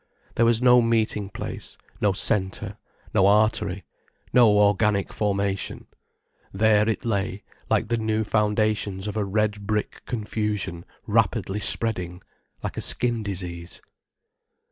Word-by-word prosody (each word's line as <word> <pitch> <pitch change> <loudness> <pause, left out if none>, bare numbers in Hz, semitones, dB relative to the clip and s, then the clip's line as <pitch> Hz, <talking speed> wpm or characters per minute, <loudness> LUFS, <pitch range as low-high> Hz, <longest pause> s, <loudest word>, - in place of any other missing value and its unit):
There 115 - +3
was 115 +1 +2
no 125 -1 +7
meeting 110 -3 0
place, - - -7 0.2
no 105 - +3
centre, 95 -1 -1 0.3
no 95 - +4
artery, 105 -2 +2 0.5
no 120 -3 +7
organic 105 0 +2
formation. 100 -2 -2 0.7
There 105 +1 +3
it 110 +3 -2
lay, 100 -3 -2 0.3
like 115 - +1
the 120 - +1
new 110 0 0
foundations 105 -2 0
of 105 - -4
a 105 - 0
red 105 0 -1
brick 105 -1 -2
confusion 105 -6 -3 0.2
rapidly 95 +2 +1
spreading, 90 -6 +1 0.4
like - - -4
a - - -2
skin 120 -2 0
disease. 90 -4 -6
105 Hz, 120 wpm, -24 LUFS, 100-110 Hz, 0.7 s, no